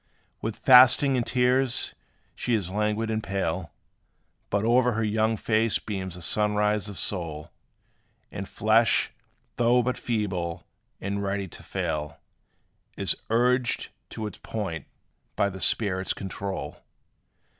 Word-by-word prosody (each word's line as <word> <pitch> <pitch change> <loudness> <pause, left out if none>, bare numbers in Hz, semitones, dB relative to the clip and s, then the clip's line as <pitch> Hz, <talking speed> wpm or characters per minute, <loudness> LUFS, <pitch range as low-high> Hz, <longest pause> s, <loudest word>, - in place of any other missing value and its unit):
With 110 -1 -3
fasting 130 +2 +7
and 125 - +1
tears 125 +1 +1 0.4
she 120 - 0
is 95 -4 -2
languid 105 +2 0
and 110 0 -1
pale; 95 -5 -2 0.8
But 100 +1 0
o'er 120 +1 +4
her 110 +1 -1
young 110 +1 +1
face 110 +1 +2
beams 95 -4 -5
the 90 - -9
sunrise 105 +1 +1
of 100 - -8
soul; 80 -6 -3 0.8
And 95 0 -6
flesh, 110 +2 +3 0.5
though 120 +1 +4
but 125 +1 -2
feeble, 95 -8 -2 0.3
and 100 +1 -3
ready 100 0 -2
to - - -12
fail, 75 -1 -3 0.8
Is - - +1
urged 125 +2 +1 0.2
to 110 - -5
its 105 - -7
point 100 -7 -5 0.5
by 100 - +1
the 95 0 -8
spirit's 95 -4 +1
control. 95 0 -5
105 Hz, 125 wpm, -26 LUFS, 95-115 Hz, 0.8 s, fasting